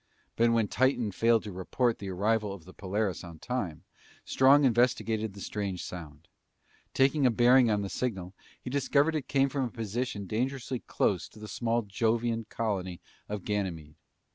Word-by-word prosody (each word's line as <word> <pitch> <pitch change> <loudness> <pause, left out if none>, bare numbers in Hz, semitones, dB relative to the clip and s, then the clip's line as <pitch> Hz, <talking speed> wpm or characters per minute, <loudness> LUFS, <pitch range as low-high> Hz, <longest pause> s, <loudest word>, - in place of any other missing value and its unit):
But 115 0 +3
when 115 -2 +2
Titan 125 -3 +1
failed 115 +3 +3
to 105 - -6
report 115 +6 -1
the 100 - -5
arrival 105 +2 0
of 90 -5 -11
the 95 - -13
Polaris 100 -1 -2
on 85 -2 -10
time, 95 -7 -4 0.4
Strong 140 +2 +5
investigated 115 -4 +1
the 100 - -9
strange 100 -4 -3
sound. 80 -2 -9 0.7
Taking 135 +1 +4
a - - +5
bearing 120 +1 +5
on 105 -1 +1
the - - -3
signal, 95 -8 -3 0.3
he 125 - -7
discovered 140 +3 +2
it 155 -4 -3
came 135 -1 +3
from 135 -1 -1
a - - -3
position 110 -1 -3
dangerously 125 +4 -2
close 90 -6 -1
to - - -18
the 105 - -8
small 115 +1 -1
Jovian 115 +2 0
colony 95 -6 -2 0.3
of 105 -2 -4
Ganymede. 90 -8 -3
110 Hz, 165 wpm, -29 LUFS, 95-125 Hz, 0.7 s, Strong